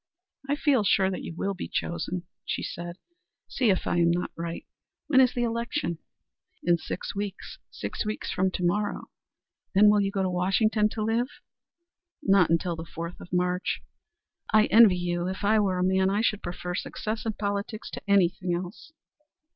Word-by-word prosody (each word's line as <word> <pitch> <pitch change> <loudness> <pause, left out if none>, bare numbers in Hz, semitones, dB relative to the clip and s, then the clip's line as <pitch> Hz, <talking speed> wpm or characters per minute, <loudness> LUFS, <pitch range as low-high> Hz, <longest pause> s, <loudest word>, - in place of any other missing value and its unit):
"I 285 - +3
feel 285 -6 +2
sure 190 -1 +3
that 185 - -4
you 165 - -7
will 195 +3 -1
be 185 - -6
chosen," 170 +1 -3 0.2
she - - -3
said. 175 +1 -6 0.5
"See 250 -4 +1
if 185 - +1
I - - 0
am 170 -1 +4
not 175 +1 0
right. 170 0 -5 0.4
When 265 -4 +5
is 255 -1 +3
the 240 - +1
election?" 235 - -2 0.6
"In 170 0 +3
six 175 - -5
weeks. 200 -1 -5
Six - - -4
weeks 215 0 -3
from 190 +1 +1
to 180 - -3
morrow." 205 +4 -1 0.6
"Then 200 - +6
you 210 - +9
will 205 -1 +3
go 195 -1 -1
to 185 - +1
Washington 210 +4 +2
to 220 - -2
live?" 230 +3 +1 1.0
"Not 195 - +4
until 170 +1 +1
the 165 - -6
fourth 170 +1 -7
of - - -12
March." 180 +1 0 0.7
"I 215 0 +6
envy 215 -5 +7
you. 175 0 -1
If 190 +2 -4
I 215 +2 +4
were 190 -3 +1
a 180 - +1
man 190 +1 +3
I 205 +2 +1
should 215 -2 +1
prefer 180 0 -5
success 215 +4 -4
in 225 -2 -1
politics 205 +1 -3
to - - -6
anything 180 -2 +2
else." 180 - -7
195 Hz, 180 wpm, -27 LUFS, 175-215 Hz, 1.0 s, you